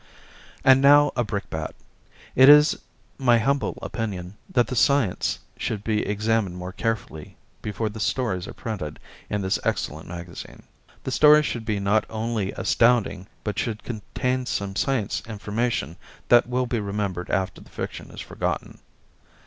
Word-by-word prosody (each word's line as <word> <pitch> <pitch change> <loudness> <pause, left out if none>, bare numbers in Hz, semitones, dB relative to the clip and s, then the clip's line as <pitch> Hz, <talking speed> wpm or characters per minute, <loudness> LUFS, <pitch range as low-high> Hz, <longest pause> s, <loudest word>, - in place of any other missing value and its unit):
And 135 0 +6
now 145 +1 +6
a 120 - +1
brickbat. 100 -7 -4 0.6
It 130 +2 +8
is 150 +1 +8 0.4
my 120 -3 +5
humble 135 +5 0
opinion 95 -5 -4
that 120 -2 +3
the 125 - -5
science 130 -5 +2 0.2
should 105 -2 -3
be 110 -1 0
examined 105 -3 0
more 90 +1 -6
carefully 105 -8 -4 0.2
before 105 +1 -2
the 110 +1 -6
stories 105 -5 -1
are - - -8
printed 95 -11 -5 0.3
in 105 -1 -1
this 95 - 0
excellent 80 +1 -2
magazine. 85 0 -9 0.4
The 130 - -3
stories 150 +2 +6
should 115 -4 -3
be 105 -3 -1
not 100 +2 +2
only 110 -3 -2
astounding, 115 -5 +2 0.2
but 105 - -2
should 110 -3 -3
contain 125 +3 -3
some 100 -3 -2
science 115 -1 0
information 105 - -2 0.3
that 120 0 +6
will 125 +1 +1
be 120 -1 -1
remembered 100 -3 -3
after 95 -3 -1
the - - -16
fiction - - -6
is - - -8
forgotten. - - -4
110 Hz, 150 wpm, -24 LUFS, 100-125 Hz, 0.6 s, It